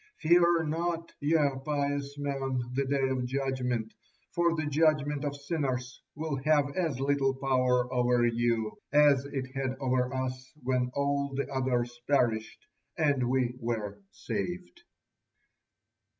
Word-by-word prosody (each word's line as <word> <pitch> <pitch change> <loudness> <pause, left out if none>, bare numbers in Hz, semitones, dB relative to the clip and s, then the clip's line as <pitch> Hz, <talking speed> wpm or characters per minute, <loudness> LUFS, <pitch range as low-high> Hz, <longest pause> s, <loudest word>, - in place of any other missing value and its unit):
Fear 170 0 +4
not, 165 +2 -2
ye 155 +3 +3 0.3
pious 145 -1 -2
men, 135 -2 -2
the 140 +2 0
Day 135 -1 +1
of 130 -1 -1
Judgement, 125 -3 -2 0.4
for 170 -1 +2
the 155 -1 -2
judgement 150 -1 +2
of 145 -1 -2
sinners 140 -4 -3
will 155 -1 -2
have 145 0 +2
as 160 -8 -1
little 135 -1 +1
power 130 -2 +2
over 125 -1 +3
you 115 -2 0
as 145 -2 +5
it 130 -2 -4
had 135 -1 -2
over 130 -1 +1
us 130 0 -4
when 125 -1 +1
all 140 0 0
the 140 - -1
others 120 -2 -1
perished 115 -6 +1 0.3
and 140 -5 +2
we 125 -2 +1
were 115 - -3
saved." 180 - -5
135 Hz, 130 wpm, -29 LUFS, 125-145 Hz, 0.4 s, as